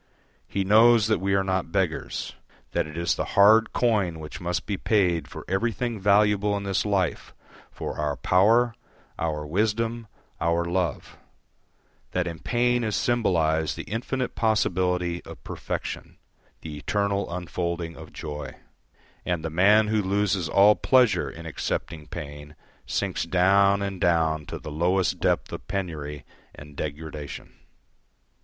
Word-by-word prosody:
He 100 - -1
knows 110 +2 +6
that 110 0 +1
we 95 +1 +1
are 95 - +2
not 95 -3 -1
beggars; 90 -4 -2 0.4
that - - 0
it 75 +1 -9
is 85 0 +1
the - - -2
hard 110 +3 +6
coin 105 -9 +1
which 75 +2 -8
must 90 0 -2
be 105 - -2
paid 90 -7 +1
for - - -9
everything 115 +3 -1
valuable 105 +1 +3
in 100 - -4
this 100 +1 0
life, 95 -4 -1 0.3
for - - -6
our 75 -1 0
power, 110 - +3 0.5
our 75 -2 -2
wisdom, 110 +6 -1 0.3
our 85 +1 +1
love; 85 -2 -2 1.0
that 90 -1 0
in 85 -2 -5
pain 120 +3 +1
is 110 -2 -1
symbolised 80 -10 +1
the - - -4
infinite 125 +4 -3
possibility 90 -5 0
of - - -12
perfection, - - -5 0.4
the 75 -2 -7
eternal 100 +1 -1
unfolding 85 -1 -3
of - - -11
joy; 75 -3 -7 0.7
and 85 -3 -2
the 80 - -3
man 105 +5 +4
who 110 -1 +2
loses 95 -3 0
all 100 +2 +6
pleasure 110 - +3
in 80 +4 -10
accepting 80 -1 -4
pain 75 +1 -8 0.3
sinks - - -1
down 100 +2 +3
and 95 -2 -4
down 80 -3 +2
to - - -5
the 75 - -8
lowest 90 +5 +1
depth - - 0
of - - -7
penury 80 -7 -4 0.3
and 75 0 -12
degradation. 75 -1 -6
95 Hz, 140 wpm, -25 LUFS, 80-105 Hz, 1.0 s, knows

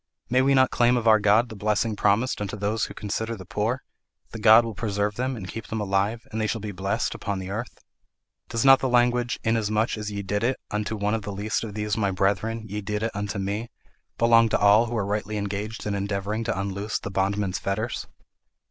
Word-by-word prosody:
May 130 +1 +4
we 135 +1 +3
not 130 -1 +4
claim 120 +1 +3
of 115 -1 -1
our 110 -1 +7
God 105 +4 +3
the 110 - -8
blessing 105 +2 0
promised 105 +4 +1
unto 105 0 -4
those 105 +2 0
who - - -10
consider 110 +3 -3
the 95 -3 -10
poor: 110 +7 -2 0.5
the 110 - -7
Lord 115 +1 +8
will 115 - -4
preserve 105 0 -1
them 130 +4 -2
and 100 -5 -7
keep 115 +4 -7
them 110 - -3
alive, 105 +3 0
and 110 0 -2
they 110 - +1
shall 115 - -2
be 105 0 -5
blessed 95 +1 -1
upon 100 -1 -3
the 95 0 -5
earth? 110 +4 -5 0.7
Does 115 +2 -1
not 135 0 +8
the 130 - -1
language, 120 0 +2
'Inasmuch 110 0 0
as 105 -1 -4
ye 100 0 -4
did 105 +2 -2
it 130 +3 0
unto 105 +1 -2
one 105 0 -1
of 110 - 0
the 100 - -6
least 105 +3 -2
of 105 -3 -6
these 105 -1 -1
my 100 -3 +1
brethren, 100 +4 0
ye 105 +1 -4
did 105 +1 -3
it 115 - 0
unto 105 0 -3
me,' 100 +4 -3 0.5
belong 115 -1 +5
to - - +2
all 105 +3 +5
who 120 0 -3
are 100 - 0
rightly 105 +1 -2
engaged 105 +2 -4
in 105 - -1
endeavouring 100 +2 -2
to 110 -4 -1
unloose 100 +2 -2
the 100 - -6
bondman's 95 0 0
fetters? 110 +4 -3
105 Hz, 225 wpm, -25 LUFS, 100-115 Hz, 0.7 s, Lord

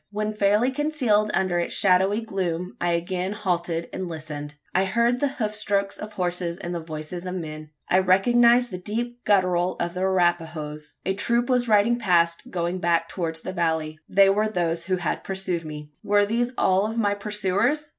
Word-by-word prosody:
When 210 +1 -2
fairly 210 +4 +2
concealed 260 -8 +1
under 185 -2 +1
its 170 - -2
shadowy 195 +3 +3
gloom, 185 -4 -3
I 175 0 +1
again 180 +3 -2
halted 175 -5 -2
and 185 -2 -4
listened. 150 -2 -7 0.2
I 190 +1 +3
heard 235 +5 +1
the 285 - +2
hoof 215 -3 -3
strokes 200 -2 -1
of 210 0 -7
horses 175 -1 -2
and 175 -1 -5
the 170 - -2
voices 160 +2 -7
of 180 - -4
men. 155 -3 -6 0.2
I 185 - +4
recognised 240 +6 +4
the 180 - -5
deep 240 +5 -4
guttural 185 -3 +2
of 170 0 -2
the 180 - -5
Arapahoes. 165 -5 -1
A 190 - +1
troop 235 +5 0
was 250 -1 +2
riding 220 +2 +3
past, 170 -5 +2
going 175 +1 -2
back 170 -1 +1
towards 160 -3 -3
the 185 - -5
valley. 160 -3 -1
They 195 +1 +5
were 210 +2 +1
those 170 -4 -1
who 185 0 +1
had 175 -3 -2
pursued 190 -3 -2
me. 150 -1 -8
Were 205 0 +3
these 240 +3 0
all 190 +3 +2
of 225 - -5
my 205 -3 +2
pursuers. 210 +8 0
185 Hz, 185 wpm, -24 LUFS, 170-210 Hz, 0.2 s, They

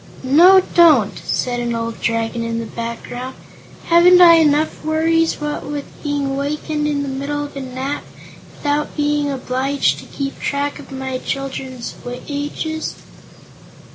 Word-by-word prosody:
"No; 345 +9 +7
don't!" 305 - +5
said 245 -1 -2
an 240 -1 -2
old 230 0 -4
Dragon 230 0 -1
in 230 0 -2
the 230 - -3
background; 235 +3 -6 0.5
"haven't 350 +2 +6
I 340 -2 +9
enough 305 -1 +2
worries, 325 +1 +2
what 295 0 -3
with 290 -1 -5 0.2
being 285 -2 -1
wakened 300 +2 -2
in 285 -1 -1
the - - -4
middle 280 +2 -3
of 290 - -9
a 275 - -4
nap, 260 +2 -4 0.5
without 295 +1 -2
being 295 -1 +1
obliged 265 +1 0
to - - -11
keep 275 -1 -5
track 285 +1 -2
of - - -12
my 265 -1 -4
children's 265 -3 -5 0.3
ages?" 295 +2 -4
285 Hz, 140 wpm, -19 LUFS, 255-300 Hz, 0.5 s, I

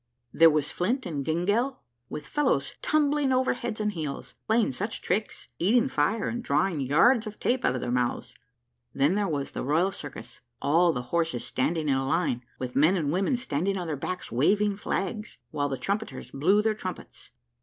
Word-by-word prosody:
There 165 0 +7
was 150 -1 0
Flint 240 +8 -1
and 145 -5 -3
Gyngell, 205 - 0 0.3
with 150 0 -6
fellows 295 - 0
tumbling 295 -2 +2
over 260 0 +2
head 235 -3 -5
and 210 0 0
heels, 155 -7 -5
playing 225 -4 +3
such 205 - -4
tricks 210 +4 -2
eating 235 +8 +3
fire, 200 - +1
and 240 +1 -3
drawing 155 +3 +1
yards 215 - +4
of 210 - -8
tape 250 +1 0
out 125 - +2
of 125 - -3
their 120 - -2
mouths. 125 0 -1 0.6
Then 140 +5 +3
there 205 0 +1
was 145 -4 -2
the - - -4
Royal 165 +8 +2
Circus, 135 -8 -9 0.2
all 170 +4 +3
the 125 -6 -3
horses 165 -7 0
standing 155 +4 -1
in 140 - +3
a 135 0 0
line, 135 -5 0
with 125 -1 -5
men 155 +7 +4
and 155 -6 0
women 195 - +1
standing 195 - -1
on 180 - -3
their 160 -2 -2
backs, 180 +6 -5
waving 200 - +2
flags, 210 +2 -3
while 145 -1 -1
the 135 - -2
trumpeters 205 +7 -3
blew 190 +9 +3
their 220 0 +2
trumpets. 215 - -8
175 Hz, 185 wpm, -27 LUFS, 145-215 Hz, 0.6 s, There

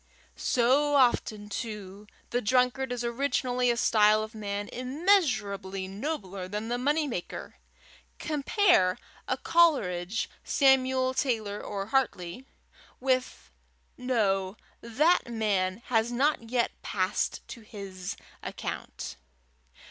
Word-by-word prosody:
So 275 +4 +2
often, 230 -5 +2
too, 210 -2 -6 0.2
the 245 - +1
drunkard 250 +3 +2
is 245 -1 -2
originally 250 0 0
a 235 - +1
style 215 -2 +4
of 220 +1 -8
man 205 -1 -4
immeasurably 245 - 0
nobler 195 - -4
than 210 +4 -4
the 245 0 -1
money 295 +4 +1
maker! 205 -10 -6 0.6
Compare 300 - +2 0.3
a - - 0
Coleridge, 225 - +2 0.2
Samuel 260 -2 +3
Taylor 220 -7 -1
or 195 -1 -4
Hartley, 240 -2 -1 0.5
with 255 -1 -1 0.4
no; 205 -6 0 0.2
that 265 +5 +2
man 205 -2 0
has 230 -1 +1
not 250 -2 +1
yet 240 -1 +1
passed 185 0 -1
to 235 - -8
his 195 -4 -7 0.2
account. - - -6
235 Hz, 105 wpm, -28 LUFS, 200-260 Hz, 0.6 s, style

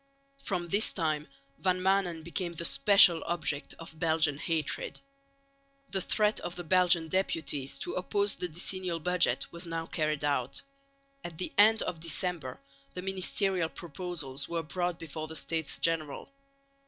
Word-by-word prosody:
From 180 -3 -2
this 205 +4 +3
time 155 -4 -1 0.3
Van 185 -1 +1
Maanen 185 -3 +1
became 170 +1 -3
the 170 - -3
special 185 -3 +6
object 160 -4 -2
of 165 -1 -11
Belgian 160 -3 +2
hatred. 160 -3 -2 0.9
The 190 - 0
threat 210 +3 +1
of 175 0 -5
the 175 - -5
Belgian 175 -1 +4
deputies 155 -7 -1
to - - -3
oppose 200 +2 +1
the 180 - -3
decennial 175 +1 -1
budget 180 +2 +1
was 170 +1 -7
now 165 0 -3
carried 155 -3 -1
out. 140 - 0 0.6
At 165 -2 -7
the 185 - -4
end 220 +1 +6
of 175 -3 -4
December 165 -4 -3 0.4
the 180 - -5
ministerial 190 -2 +1
proposals 165 -7 -6
were 170 -1 -2
brought 175 +2 -2
before 155 -1 -6
the 160 - -7
States 160 -1 -1
General. 165 - -2
170 Hz, 145 wpm, -30 LUFS, 160-185 Hz, 0.9 s, special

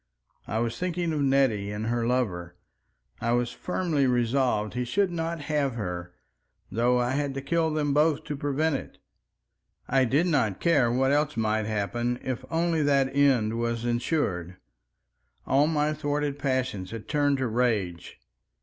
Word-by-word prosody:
I 110 - -2
was 115 0 -1
thinking 175 -2 -1
of 150 - -1
Nettie 135 -7 +2
and 105 +1 -4
her 115 0 0
lover. 90 -9 -1 0.6
I 115 +1 0
was 120 0 +1
firmly 165 -3 0
resolved 120 -3 +1
he 125 +1 -1
should 190 +9 +1
not 165 -1 -3
have 145 -4 -1
her—though 90 - -3
I 125 0 +1
had 140 0 -1
to 135 - -3
kill 165 +3 +1
them 150 -2 0
both 150 0 +2
to 145 - -4
prevent 145 +2 0
it. - - -11 0.9
I 130 0 +3
did 140 +8 +2
not 130 - +1
care 140 -9 +3
what 135 +2 +2
else 150 -1 +1
might 110 -1 0
happen, 120 +3 -1
if 130 -3 -3
only 165 -1 +1
that 140 -2 +2
end 120 -6 +3
was 115 0 -1
ensured. 120 - -1 0.9
All 140 +3 +3
my 150 -1 +1
thwarted 145 -1 -2
passions 130 -9 -1
had 115 -2 -8
turned 145 -2 +2
to 130 - -1
rage. 110 -8 -1
130 Hz, 155 wpm, -27 LUFS, 115-145 Hz, 0.9 s, I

